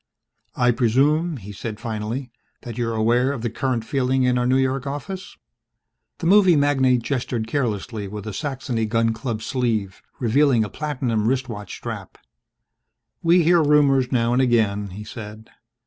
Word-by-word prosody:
"I 125 -1 +3
presume," 145 +8 +2
he 105 -3 -9
said 105 +2 -6
finally, 115 +3 -4 0.3
"that 120 -2 -7
you're 115 -1 -2
aware 120 +4 +2
of 130 -5 -5
the 120 - -1
current 120 -2 -2
feeling 130 0 +1
in 125 0 +2
our 125 - +1
New 130 +1 +3
York 130 +1 0
office?" 180 +7 -6 0.8
The - - -6
movie 190 -1 +6
magnate 135 -4 +3
gestured 120 -4 -2
carelessly 110 -4 -2
with 105 +1 -7
a 110 - -5
Saxony 125 -3 -2
gun 115 0 +1
club 115 -1 -4
sleeve, 110 -8 -1 0.2
revealing 125 0 +3
a 105 - -4
platinum 125 -8 -2
wristwatch 120 -6 -2
strap. - - -7 1.0
"We 170 +1 +4
hear 170 +1 +5
rumors 140 -4 +3
now 120 -2 +2
and 125 - +3
again," 110 -5 +1
he 100 +3 -8
said. 110 -1 -10
125 Hz, 155 wpm, -22 LUFS, 110-135 Hz, 1.0 s, movie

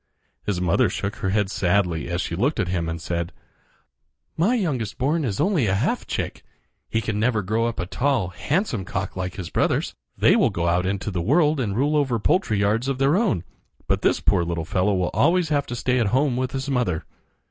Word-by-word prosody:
His 100 -4 0
mother 90 -2 +2
shook 100 +1 -4
her 95 - -2
head 100 0 +1
sadly 90 -4 +1
as 85 +1 -1
she 85 - -3
looked 125 - 0
at 90 - 0
him 85 -3 -1
and 80 0 -4
said: 85 +1 -3 1.0
"My 195 +10 +2
youngest 135 - -2
born 150 +5 +1
is 105 -7 -2
only 175 - +2
a 95 - +2
half 100 - -1
chick. - - -3 0.5
He 115 - 0
can 110 -1 -2
never 110 -2 +1
grow 110 +5 0
up 115 - -4
a 90 - -1
tall, 125 -1 0
handsome 140 - -1
cock 95 +1 -4
like 95 -1 -4
his 95 -5 -6
brothers. - - 0 0.2
They - - +5
will - - +4
go 85 0 -2
out 90 +2 +2
into 100 +2 -2
the 90 -2 -2
world 150 - +3
and 105 -6 -1
rule 145 +4 +2
over 135 -5 +2
poultry 115 - +1
yards 105 +5 +1
of 135 -1 -1
their 135 +4 +3
own; 195 - +1 0.4
but - - 0
this - - +2
poor 85 - +3
little 85 -1 -3
fellow 95 +4 +1
will 90 -1 0
always 170 -1 +3
have 145 -2 +1
to 120 - -4
stay 125 +1 +1
at 115 - +2
home 130 +4 +2
with 130 +1 -2
his 135 0 -3
mother." 125 - 0
110 Hz, 215 wpm, -23 LUFS, 90-135 Hz, 1.0 s, They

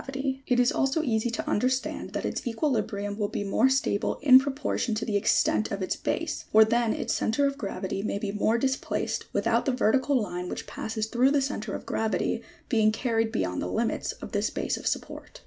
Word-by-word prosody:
V 270 0 -3
It 250 -1 +2
is 245 0 +4
also 275 +4 +1
easy 230 -4 0
to 230 - -4
understand 255 +4 -1
that - - -3
its - - -3
equilibrium 215 -5 -1
will 205 - +1
be 205 - -3
more 220 +6 +3
stable 265 -6 0
in 260 -2 +9
proportion 270 -4 -2
to 220 - -2
the 210 - -2
extent 210 +1 +2
of 200 -1 -3
its 185 - -1
base; - - -3
for 220 0 +7
then 235 0 +1
its 265 -4 -1
centre 280 +6 +1
of 275 0 0
gravity 195 -4 -4
may 205 -1 -2
be 200 -1 -3
more 215 +2 +1
displaced, 265 +2 -1
without - - +1
the - - +4
vertical 260 +2 +2
line 180 -4 -4
which - - -5
passes 220 -1 -3
through 245 +4 +3
the 285 0 +3
centre 245 -7 -3
of - - -7
gravity, 220 0 -1 0.3
being 220 -4 +3
carried 225 -1 0
beyond 90 - -1
the - - -2
limits 90 - -1
of - - -10
this - - 0
base - - -2
of - - -5
support. - - -4
225 Hz, 205 wpm, -27 LUFS, 210-265 Hz, 0.3 s, in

